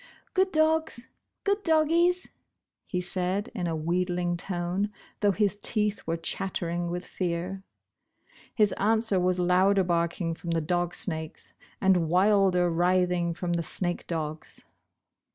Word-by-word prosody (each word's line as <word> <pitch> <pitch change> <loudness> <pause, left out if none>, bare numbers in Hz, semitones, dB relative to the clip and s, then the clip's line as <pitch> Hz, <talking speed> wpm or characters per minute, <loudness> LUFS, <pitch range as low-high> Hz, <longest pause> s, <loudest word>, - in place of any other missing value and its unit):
"Good 380 0 +2
dogs, 315 -5 +1 0.3
good 400 +1 +1
doggies," 340 +2 +3 0.6
he 180 - -2
said, 185 +3 -2
in 180 -7 -2
a 165 - -1
wheedling 175 +2 0
tone, 180 +3 -2 0.3
though 205 - +3
his 205 0 0
teeth 210 -4 +1
were 165 0 0
chattering 175 0 -2
with 175 +1 -4
fear. 180 +1 -3 0.9
His 210 -2 +4
answer 220 -1 +2
was 180 0 +1
louder 185 +2 +4
barking 170 -1 0
from 170 +1 -8
the 165 0 +1
dog 175 +2 -1
snakes, 160 -3 -4 0.3
and 180 -4 +3
wilder 185 -1 +4
writhing 175 0 +1
from 175 0 -2
the 170 - 0
snake 175 +2 -2
dogs. 155 -1 -4
180 Hz, 130 wpm, -27 LUFS, 175-205 Hz, 0.9 s, His